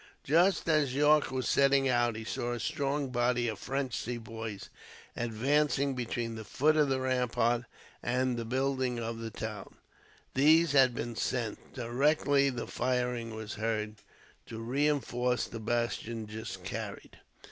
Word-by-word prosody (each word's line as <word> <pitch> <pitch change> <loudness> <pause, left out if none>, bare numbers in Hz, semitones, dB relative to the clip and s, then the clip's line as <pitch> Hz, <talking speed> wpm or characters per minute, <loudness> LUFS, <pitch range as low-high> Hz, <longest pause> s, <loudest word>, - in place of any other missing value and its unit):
Just 175 +6 +3
as 150 -5 +2
Yorke 150 +1 +4
was 130 -1 -2
setting 140 -1 +4
out 120 -2 +2
he 110 - -5
saw 120 +2 -2
a 120 - -4
strong 140 +3 -1
body 120 -1 +1
of 110 -3 -3
French 135 -1 -2
Sepoys, 115 -3 -5 0.4
advancing 135 +5 +1
between 120 -2 -3
the 110 -1 -6
foot 150 +8 +2
of 150 -2 +3
the 135 -1 +1
ramparts 125 -2 +1 0.4
and 125 +1 0
the 115 - -3
buildings 130 0 0
of 115 0 -4
the 115 0 -4
town. 105 -2 -6 0.6
These 155 +4 +5
had 130 -3 +5
been 120 0 -4
sent, 115 -2 -3
directly 140 +3 +2
the 125 -3 -4
firing 125 -2 -1
was 110 -1 -6
heard, 110 0 -2 0.5
to 115 - -7
reinforce 125 0 0
the 115 - -7
bastion 115 0 -2
just 105 -3 -7
carried. 100 +2 -6
125 Hz, 145 wpm, -31 LUFS, 115-135 Hz, 0.6 s, These